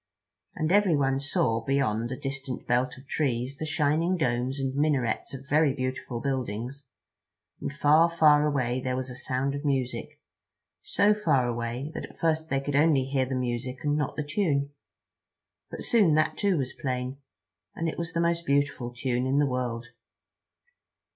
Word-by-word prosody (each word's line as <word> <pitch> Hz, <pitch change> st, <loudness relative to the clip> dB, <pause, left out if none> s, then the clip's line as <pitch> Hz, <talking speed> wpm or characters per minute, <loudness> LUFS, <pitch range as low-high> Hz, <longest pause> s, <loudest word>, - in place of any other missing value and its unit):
And 155 Hz, +2 st, -1 dB
everyone 150 Hz, -10 st, +3 dB
saw, 140 Hz, -6 st, 0 dB
beyond 120 Hz, -3 st, 0 dB
a 130 Hz, -, -3 dB
distant 135 Hz, -2 st, -5 dB
belt 125 Hz, +1 st, +1 dB
of 130 Hz, -, -14 dB
trees 130 Hz, -2 st, -1 dB
the 155 Hz, -, -4 dB
shining 160 Hz, +3 st, +1 dB
domes 130 Hz, -2 st, 0 dB
and 135 Hz, -1 st, -1 dB
minarets 140 Hz, -6 st, 0 dB
of 135 Hz, +1 st, -10 dB
very 145 Hz, -1 st, +3 dB
beautiful 130 Hz, -2 st, -3 dB
buildings, 130 Hz, +1 st, -3 dB, 0.7 s
and -, -, -3 dB
far, 150 Hz, +3 st, +4 dB
far 150 Hz, -3 st, +5 dB
away 130 Hz, -3 st, 0 dB
there 130 Hz, -1 st, -1 dB
was 130 Hz, 0 st, -3 dB
a -, -, -8 dB
sound 130 Hz, +2 st, -1 dB
of 140 Hz, +1 st, -4 dB
music, 135 Hz, -4 st, -2 dB, 0.6 s
so 205 Hz, +1 st, +3 dB
far 140 Hz, -12 st, +2 dB
away 120 Hz, +4 st, -3 dB
that -, -, -5 dB
at -, -, -16 dB
first 160 Hz, -1 st, 0 dB
they 135 Hz, -, +1 dB
could 140 Hz, 0 st, -3 dB
only 145 Hz, -3 st, +4 dB
hear 135 Hz, -1 st, 0 dB
the 130 Hz, -, -2 dB
music 125 Hz, +1 st, -3 dB
and 145 Hz, -1 st, +1 dB
not 150 Hz, -3 st, -1 dB
the 150 Hz, -, -3 dB
tune. 145 Hz, -4 st, 0 dB, 1.0 s
But -, -, -7 dB
soon 200 Hz, -10 st, +4 dB
that 155 Hz, -, +2 dB
too 200 Hz, -4 st, +1 dB
was 130 Hz, -3 st, -2 dB
plain, 130 Hz, 0 st, -3 dB, 0.6 s
and 165 Hz, -, -2 dB
it 160 Hz, -, -3 dB
was 170 Hz, -1 st, -3 dB
the 170 Hz, -, +1 dB
most 170 Hz, 0 st, +1 dB
beautiful 140 Hz, -4 st, 0 dB
tune 125 Hz, 0 st, -1 dB
in 135 Hz, +2 st, +1 dB
the 145 Hz, -, +4 dB
world. 125 Hz, -3 st, -2 dB
135 Hz, 170 wpm, -27 LUFS, 125-150 Hz, 1.0 s, far